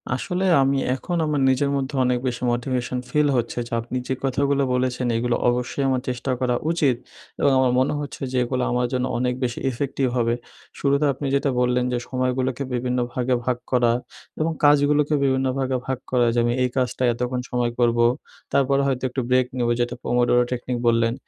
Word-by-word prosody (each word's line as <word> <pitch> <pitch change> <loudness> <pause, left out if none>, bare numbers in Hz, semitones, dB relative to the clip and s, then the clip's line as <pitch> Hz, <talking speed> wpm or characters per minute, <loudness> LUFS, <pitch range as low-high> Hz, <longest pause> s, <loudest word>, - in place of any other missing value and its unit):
আসলে 180 +8 -2 0.2
আমি 135 +1 +2 0.2
এখন 175 +6 -3
আমার 150 -2 0
নিজের 140 +2 +2
মধ্যে 140 +1 -2
অনেক 125 -1 +1
বেশি 125 0 -3
মোটিভেশন 125 +1 -2
ফিল 150 +2 +2
হচ্ছে 120 +1 -2
যে 120 - -9
আপনি 120 +2 -4
যে - - 0
কথাগুলো 140 +1 +1
বলেছেন 125 0 0
এগুলো 120 +1 0
অবশ্যই 125 +3 -1
আমার 130 -1 +1
চেষ্টা 125 +1 -3
করা 125 -1 +1 0.2
উচিত। 145 -7 +2 0.4
এবং 140 - +4
আমার 130 -1 +3
মনে 130 - +1
হচ্ছে 145 -1 -7
যে 130 - -1
এগুলা 125 +1 -1
আমার 125 0 +1
জন্য 125 0 0
অনেক 125 0 0
বেশি 120 -1 -2
ইফেক্টিভ 135 +1 -1
হবে। 120 0 +1 0.4
শুরুতে 140 +1 +2
আপনি 140 +3 -6
যেটা 140 0 +1
বললেন 125 0 +2
যে - - +1
সময়গুলোকে 130 +1 -1
বিভিন্ন 125 +1 -1
ভাগে 125 0 +1
ভাগ 125 -1 0
করা 125 -2 +3 0.5
এবং 160 +1 +1
কাজগুলোকে 145 +1 +4
বিভিন্ন 130 -1 +2
ভাগে 130 -1 0
ভাগ 130 -1 -2
করা 125 -1 +3
যে 120 - +1
আমি 120 - +1
এই 125 - +1
কাজটা 130 0 0
এতক্ষণ 125 +1 -2
সময় 120 -1 0
করবো, 120 -1 +3 0.5
তারপরে 140 0 +3
হয়তো 130 -2 -1
একটু 130 +1 -2
ব্রেক 125 0 +4
নেব 120 -1 +1
যেটা 120 0 -1
পোমোডোরো 120 0 +3
টেকনিক 125 0 -2
বললেন। 115 0 +3
125 Hz, 185 wpm, -23 LUFS, 125-135 Hz, 0.5 s, এবং